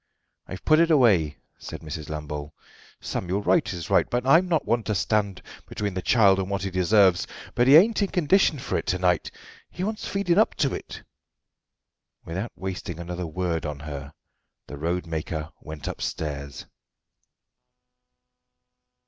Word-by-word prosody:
"I've 95 - -8
put 155 0 +5
it 170 0 +4
away," 100 - +4 0.2
said - - -8
Mrs. 75 0 -7
Lambole. 75 -1 -6 0.5
"Samuel, 95 +3 -3
right 165 - +2
is 85 -3 -6
right, - - +4
and 125 +1 -1
I'm 165 +7 +5
not 165 -3 +1
one 120 +2 +1
to 105 - -1
stand 100 -1 0 0.2
between 100 -2 -3
the 95 - -3
child 100 -3 +4
and 95 0 -2
what 100 -1 -2
he 95 - -3
deserves, 95 0 +3 0.3
but 120 +1 +2
he 135 - +8
ain't 210 +7 +6
in 200 - +2
condition 180 -2 +2
for 125 - -2
it - - -8
to 90 - +1
night. 90 -1 +1 0.4
He 180 - -6
wants 215 +2 -3
feeding 195 -2 +1
up 220 - +3
to 140 -4 0
it." - - -7 1.2
Without 95 +8 -4
wasting 90 -3 -5
another 85 0 -5
word 85 0 -2
on 75 -3 -4
her 70 -1 -7 0.5
the - - -8
roadmaker 80 -1 -3
went 75 -2 -8
upstairs. 70 -3 -5
95 Hz, 155 wpm, -25 LUFS, 80-125 Hz, 1.2 s, he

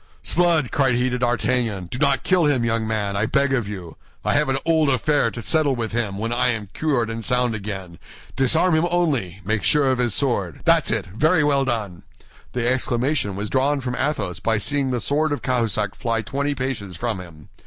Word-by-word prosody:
"S'blood!" 170 -5 +2
cried 135 -5 +2
he 125 +1 +1
to 125 - -2
D'Artagnan, 120 -5 0
"do 125 +8 -6
not 140 -2 +2
kill 180 -3 +3
him, 130 -5 +2
young 115 -1 0
man, 105 -3 -1
I 105 +2 0
beg 140 0 +1
of 120 -6 0
you. 95 -5 -8 0.3
I - - +2
have 145 -1 +2
an 135 - +1
old 160 -3 +3
affair 140 -1 +2
to 115 0 -7
settle 150 +1 +1
with 115 -2 -3
him 110 -4 -2
when 115 +3 -2
I 120 - +1
am 110 -5 -2
cured 130 -8 0
and 115 0 -5
sound 125 -2 +1
again. 95 -5 -6 0.4
Disarm 160 +7 +3
him 160 +2 +3
only—make 110 - -1
sure 150 -2 +3
of 130 -1 +1
his 120 -4 +1
sword. 100 - -1
That's - - +4
it! - - -1
Very 155 - +2
well 140 -2 +2
done!" 105 -8 -3 0.5
The 125 -1 -1
exclamation 125 -3 0
was 100 +2 -3
drawn 135 +4 +1
from 125 -1 -3
Athos 130 - -1
by 110 +2 +1
seeing 135 +5 -1
the 125 -1 -1
sword 150 +6 0
of 145 - -3
Cahusac 110 -6 0
fly 115 -2 -2
twenty 140 +5 -2
paces 125 -8 -3
from 115 0 -3
him. 80 -5 -12
125 Hz, 205 wpm, -22 LUFS, 110-140 Hz, 0.5 s, That's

